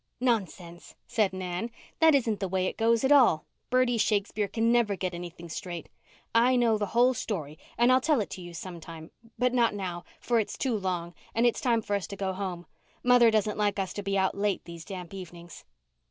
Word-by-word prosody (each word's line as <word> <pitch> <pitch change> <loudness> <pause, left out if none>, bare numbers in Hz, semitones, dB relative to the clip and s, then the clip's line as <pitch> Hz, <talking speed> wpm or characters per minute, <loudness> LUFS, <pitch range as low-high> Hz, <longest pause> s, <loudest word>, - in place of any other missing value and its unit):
"Nonsense," 190 -8 -2
said 210 -4 +1
Nan. 185 +3 -4 0.3
"That 320 -2 +6
isn't 225 -6 +1
the 195 - -1
way 185 0 0
it - - -2
goes 230 +1 +2
at 265 - +2
all. 245 - +5 0.2
Bertie 250 -2 +2
Shakespeare 205 0 +1
can 230 +3 +1
never 235 -4 +3
get 185 -1 -3
anything 175 0 -8
straight. 170 0 -6 0.4
I 240 +3 +4
know 230 -3 +3
the 205 - -1
whole 250 +2 +5
story 160 - -4 0.2
and 240 +2 +5
I'll 255 +1 +5
tell 300 -1 +2
it 210 - -3
to 185 - -7
you 175 -1 -9
some 175 +1 -7
time, 160 0 -10 0.3
but 250 0 +1
not 235 -4 +2
now, 180 -3 -4 0.2
for 235 -1 +1
it's 215 - -3
too 255 -4 0
long 180 -4 -3 0.2
and 230 +2 +3
it's 240 - +2
time 235 -4 +2
for 205 -1 -1
us 200 - -3
to 200 - -7
go 190 -1 -2
home. 185 -2 -5 0.4
Mother 245 -1 +6
doesn't 215 -1 0
like 205 -1 +1
us 190 -2 -2
to 205 - -4
be 195 0 -1
out 190 0 +2
late 200 -1 -1
these 170 -1 -9
damp 180 -1 -8
evenings." 175 -3 -10
200 Hz, 210 wpm, -28 LUFS, 180-235 Hz, 0.4 s, That